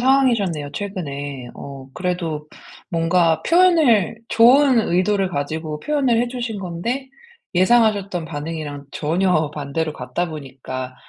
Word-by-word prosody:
상황이셨네요 230 - +2
최근에. 145 -9 -5
어 135 -1 -9
그래도 170 -4 -3 0.4
뭔가 165 -1 +2
표현을 320 - +4
좋은 255 +3 +6
의도를 190 +2 +2
가지고 155 0 -3
표현을 270 -6 +1
해 245 - +1
주신 240 -3 -4
건데 195 +9 -4 0.5
예상하셨던 200 -3 +3
반응이랑 150 -2 -6
전혀 160 -1 +1
반대로 150 +2 -2
갔다 175 +3 -3
보니까 130 -4 -7
175 Hz, 285 characters per minute, -21 LUFS, 150-230 Hz, 0.5 s, 좋은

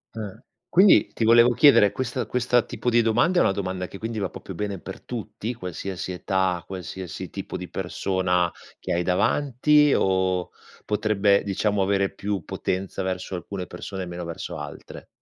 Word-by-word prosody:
Eh. 105 -3 -6 0.3
Quindi, 190 +3 +6
ti - - -2
volevo 115 +2 +7
chiedere, 115 -7 +6
questa 125 +1 -3
questa 125 0 +2
tipo 125 - -3
di 120 0 +5
domanda 165 +11 +3
è - - +5
una - - +4
domanda 95 -2 -3
che 95 - -10
quindi 115 +1 -4
va 95 -3 -1
proprio 95 - -9
bene 100 +1 -4
per - - -9
tutti, 110 0 -5
qualsiasi 95 -1 -5
età, 90 -1 0
qualsiasi 95 -1 -7
tipo - - -5
di 90 - -7
persona 90 -1 0 0.3
che - - -3
hai 85 - +1
davanti 145 - +3
o 95 -2 +1 0.3
potrebbe, 105 -1 +2
diciamo, 100 +1 0
avere 100 0 +1
più 100 -2 -3
potenza 95 +1 -3
verso 95 0 -3
alcune 90 +1 -5
persone 95 +2 -6
e - - -5
meno 85 0 -6
verso 85 -1 -6
altre? - - -9
100 Hz, 165 wpm, -24 LUFS, 95-115 Hz, 0.3 s, volevo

